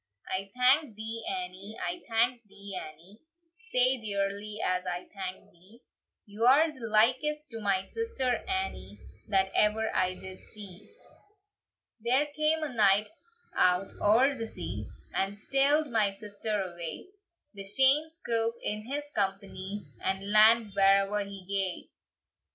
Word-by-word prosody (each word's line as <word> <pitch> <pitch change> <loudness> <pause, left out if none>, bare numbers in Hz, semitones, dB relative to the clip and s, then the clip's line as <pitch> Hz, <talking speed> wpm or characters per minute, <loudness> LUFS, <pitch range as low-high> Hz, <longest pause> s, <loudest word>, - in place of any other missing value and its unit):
"I 195 +1 -3
thank 255 0 +4
thee, 225 +1 -5
Annie; 225 - -5
I 175 0 -3
thank 235 +2 +2
thee, 200 0 -9
Annie, 170 +6 -10 0.5
Sae 255 +1 +3
dearly 205 0 -2
as 185 0 0
I 180 0 -4
thank 190 -2 -7
thee; 190 +8 -19 0.4
You're 250 +9 +4
the 260 -6 -7
likest 260 +7 +2
to 225 -1 -6
my 195 -2 +1
sister 270 - -2
Annie, 380 0 -3 0.3
That 190 -2 +2
ever 220 +1 +2
I 185 0 +1
did 190 0 -10
see. 205 -2 -11 1.1
"There 250 +6 +2
came 310 +1 +2
a 290 -4 -3
knight 210 -1 +3 0.4
out 180 +1 +3
oer 240 +7 +4
the 230 -4 -5
sea, - - -5 0.3
And 195 +1 -1
steald 275 +6 +2
my 215 -3 +3
sister 205 +1 -3
away; 175 - -7 0.4
The 200 -1 -6
shame 270 +9 +4
scoup 230 -8 -1
in 215 +1 -2
his 285 +3 -2
company, 195 - -3 0.2
And 195 +1 -2
land 215 0 +6
where'er 195 +1 +4
he 200 -2 -9
gae!" 195 -2 -2
210 Hz, 135 wpm, -29 LUFS, 195-250 Hz, 1.1 s, land